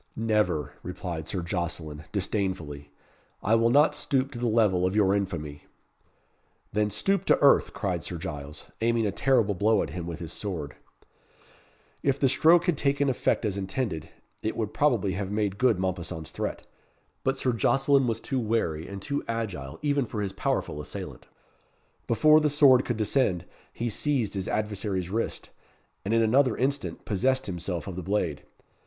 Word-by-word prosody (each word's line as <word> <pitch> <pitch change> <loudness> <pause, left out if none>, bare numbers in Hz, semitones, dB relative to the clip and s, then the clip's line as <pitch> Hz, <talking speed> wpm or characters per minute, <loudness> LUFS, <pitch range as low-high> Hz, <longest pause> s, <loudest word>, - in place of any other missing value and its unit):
"Never," 105 -10 0
replied 85 -3 -5
Sir 95 -4 -3
Jocelyn, 85 -4 -4
disdainfully. 90 -8 -2 0.5
"I 110 - +2
will 115 +1 +4
not 145 +5 +5
stoop 135 0 0
to 120 - -7
the 120 - 0
level 105 -5 +3
of 95 +2 +1
your 100 -2 +4
infamy." 85 -7 -3 1.1
"Then 105 0 +1
stoop 195 - +1
to - - +4
earth," 140 - +5
cried 90 -4 -2
Sir 85 - -5
Giles, 75 -2 -7 0.2
aiming 115 0 +2
a 100 - +1
terrible 115 -2 +2
blow 105 +3 +2
at - - -6
him 85 -2 -5
with 85 -2 -5
his 85 -1 -6
sword. 85 -9 -4 1.3
If 135 0 +1
the 135 - +4
stroke 165 +6 +5
had 175 -6 +1
taken 140 0 +2
effect 125 -2 0
as 100 -2 -1
intended, 95 - -3 0.3
it 110 - -3
would 110 -2 -2
probably 120 -10 +2
have 95 +1 -3
made 105 -1 -1
good 125 -6 +4
Mompesson's 90 -3 -3
threat, - - -4 0.6
but 135 0 +1
Sir 130 -2 0
Jocelyn 135 +4 +3
was 115 -1 -1
too 130 +3 -2
wary 105 -9 -1
and 100 -1 -7
too 140 0 -2
agile 100 -13 -4
even 145 -4 +1
for 105 -2 -3
his 95 -1 -3
powerful 75 - -2
assailant. - - -8 0.8
Before 155 +7 +5
the 155 -1 +2
sword 140 -3 +5
could 120 - -2
descend, 105 -5 +1 0.3
he 120 - -3
seized 120 -1 0
his 95 -2 -3
adversary's 100 -4 -2
wrist, 115 +3 -3 0.5
and 100 - -3
in 115 0 +4
another 125 +2 +3
instant 130 -10 -2
possessed 130 +6 +1
himself 90 -1 -4
of 95 -3 -6
the 90 - -4
blade. 90 -6 -1
105 Hz, 165 wpm, -27 LUFS, 90-125 Hz, 1.3 s, not